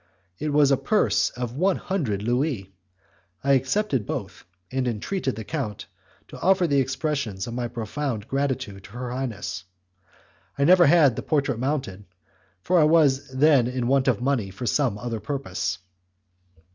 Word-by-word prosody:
It 150 0 -2
was 145 -1 +4
a 135 - +4
purse 215 - +2
of 120 -1 -5
one 185 +4 +2
hundred 125 - -2
Louis. 120 - -1 0.7
I 140 - +2
accepted 135 - +1
both, - - -5 0.3
and 130 -1 -1
entreated 130 - -2
the 110 - -6
count 115 -5 -4 0.4
to - - -10
offer 185 0 +3
the 140 -4 +2
expressions 130 -7 -2
of 115 - -6
my 120 0 -2
profound 120 0 -4
gratitude 130 -8 -2
to - - -14
her 125 0 -5
highness. 115 -8 -4 0.9
I 140 - +1
never 175 +2 +6
had 145 -6 +5
the - - -3
portrait 140 -5 0
mounted, 130 -8 -3 0.6
for 180 - +3
I - - +6
was 145 -4 +3
then 135 -2 +4
in 125 -1 -2
want 135 +1 +2
of 120 -6 +2
money 125 -6 0
for 95 +6 -7
some 125 -4 +1
other 115 +1 -4
purpose. 105 -6 -3
130 Hz, 160 wpm, -24 LUFS, 115-145 Hz, 0.9 s, never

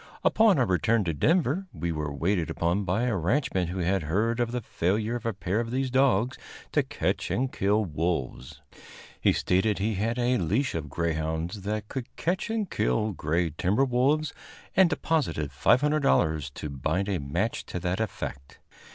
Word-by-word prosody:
Upon 220 -5 +5
our 125 - +3
return 110 +3 +2
to 85 -3 -1
Denver 160 - +1
we 85 0 -3
were 75 -2 -3
waited 85 +4 0
upon 85 +4 0
by 95 +6 0
a 125 -4 +1
ranchman 95 - 0
who 90 +2 -5
had 95 +1 +1
heard 105 +10 0
of 120 -1 0
the 125 - -1
failure 105 +4 -1
of 115 -1 -4
a - - +1
pair 95 +2 -1
of 115 -1 -2
these 130 +1 -1
dogs 130 -3 +2 0.3
to - - +3
catch - - -2
and 130 +1 0
kill 105 +2 +2
wolves. 75 -6 -3 0.6
He - - +4
stated 95 +3 +1
that 95 - -2
he 110 +1 +1
had 110 +5 -1
a 125 0 +2
leash 110 - 0
of 80 -3 -4
greyhounds 80 +4 -2
that 105 +1 -3
could 125 0 -6
catch 180 +6 -1
and 220 -2 -1
kill 105 - 0
gray 80 0 -1
timber 95 - +1
wolves, 135 +4 +1 0.4
and 185 -2 +6
deposited 145 - -1
$500 90 - +2
to 75 - -5
bind 90 +8 -1
a 100 -3 0
match 85 +11 -2
to 90 - -4
that 90 +2 -1
effect. 70 -10 -5
100 Hz, 175 wpm, -27 LUFS, 85-125 Hz, 0.6 s, and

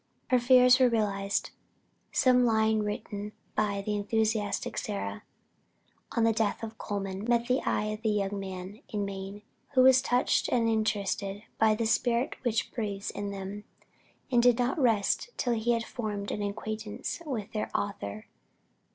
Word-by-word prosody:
Her 250 - +5
fears 250 +1 +6
were 255 -1 +6
realized. 200 -3 0 0.6
Some 250 -1 +4
lines 220 -2 +3
written 210 0 -4 0.2
by 200 -2 0
"the 210 - -1
enthusiastic 215 0 0
Sarah" 100 0 -4 0.9
on 230 - +2
the 225 0 +4
death 220 0 0
of 225 0 -7
Colman, 195 -1 -4
met 235 -1 +3
the 255 +2 +2
eye - - +1
of 215 - -7
the 220 - +1
"young 200 -1 0
man 190 +1 -7
in 205 -2 -2
Maine," 195 +1 -6 0.3
who 255 - +7
was 260 0 +7
touched 245 -1 +2
and 235 -2 +2
interested 205 -2 -1 0.2
by 220 -1 +5
the 230 +1 -1
spirit 235 +2 +1
which 235 -3 -1
breathes 205 -4 -3
in 205 0 -4
them, 200 +1 -6 0.7
and 240 -2 +5
did 245 -1 +5
not 250 +5 0
rest 230 - +2
till 245 - +1
he 230 +1 +1
had 230 -1 0
formed 210 -5 -4
an 210 - -3
acquaintance 215 +6 -4
with 250 -10 -4
their 215 - -2
author. 105 - -4
215 Hz, 160 wpm, -29 LUFS, 200-235 Hz, 0.9 s, who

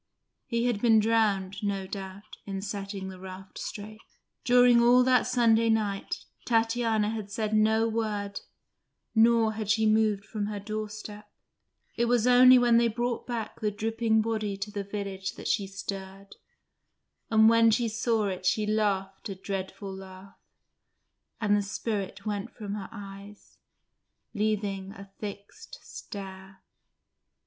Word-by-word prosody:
He 235 -2 0
had 235 -4 0
been 225 -2 +5
drowned, 210 -4 +1
no 200 -2 -2
doubt, 195 +1 -8
in 195 -1 -4
setting 195 -1 -5
the 185 -1 -10
raft 190 0 -10
straight. 215 +1 -7 0.4
During 245 -1 +6
all 245 +1 +6
that 255 0 +3
Sunday 230 -2 +3
night, 210 -3 -1 0.2
Tatiana 225 -2 +1
had 215 -3 -5
said 215 +1 -2
no 220 +1 +3
word, 210 -3 -2 0.7
nor 225 -1 +4
had 215 -2 -5
she 220 +1 +3
moved 215 -2 +2
from 210 -2 -3
her 210 -1 -4
doorstep: 215 0 -6 0.7
it 235 - +1
was 240 -1 +2
only 250 +1 +8
when 240 -1 +4
they 235 0 +4
brought 240 +1 -2
back 230 -3 -4
the 215 - 0
dripping 220 +1 0
body 215 -3 -2
to 200 +1 -5
the 205 -1 -4
village 195 -2 -5
that - - -7
she 200 -3 0
stirred, 195 0 -7 0.9
and 220 -1 +6
when 230 0 +6
she 235 +2 +2
saw 225 -1 0
it 185 -2 -3
she 210 +3 +1
laughed 200 -2 -1
a 195 - -4
dreadful 195 +1 -5
laugh, 190 0 -12 1.0
and 210 -3 +2
the 205 - +2
spirit 200 -1 -4
went 210 +1 -3
from 205 -3 -6
her 205 -2 -5
eyes, 200 -1 -11 0.7
leaving 205 -3 -2
a 195 0 -12
fixed 210 - -8
stare. 190 -1 -9
210 Hz, 140 wpm, -28 LUFS, 195-225 Hz, 1.0 s, only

